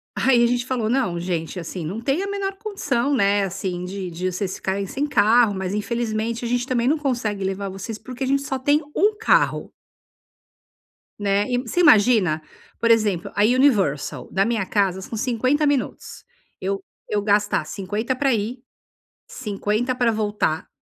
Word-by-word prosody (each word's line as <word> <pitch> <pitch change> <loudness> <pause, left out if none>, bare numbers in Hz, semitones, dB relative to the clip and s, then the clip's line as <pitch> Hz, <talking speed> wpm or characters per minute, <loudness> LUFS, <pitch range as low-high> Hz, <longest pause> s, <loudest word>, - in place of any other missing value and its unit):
aí 245 -3 +4
a - - +5
gente 245 0 0
falou: 245 -4 -1
"Não, 210 -9 0
gente, 170 0 -3
assim, 170 0 -6
não 195 +8 -4
tem 275 +9 0
a - - -3
menor 395 -1 -3
condição, 290 - -1
né, 200 -4 +3
assim, 185 -1 -3
de 190 0 -5
de 180 +2 -3
vocês 185 +1 -3
ficarem 195 0 -2
sem 285 +8 -2
carro, 225 -3 +4
mas 190 -1 -3
infelizmente 225 +2 -2
a - - -1
gente 245 +1 0
também 250 -2 0
não 310 - +3
consegue 235 -9 -2
levar 195 +1 -2
vocês, 195 +3 -6
porque 255 +3 -6
a - - -1
gente 275 +1 +2
só 275 -1 -3
tem 290 +4 +2
um 420 +3 +3
carro". 450 - +2 1.5
Né. 200 0 +1
E, 245 - +1
você 255 +8 -2
imagina? 210 - +5 0.4
Por 230 - +1
exemplo, 210 -6 +2
a 205 - +2
Universal, 200 - +2
da 195 +1 +2
minha 225 -4 -1
casa 190 -2 +1
são 210 +4 -7
50 255 +6 +1
minutos. 285 -3 -2 0.4
Eu 195 +1 -2 0.3
eu 205 -1 0
gastar 205 0 +2
50 210 +6 -3
pra 270 -1 +2
ir, 225 +4 -2 0.7
50 215 +2 -2
pra 240 -2 +2
voltar, 210 -7 -1
220 Hz, 170 wpm, -22 LUFS, 195-255 Hz, 1.5 s, a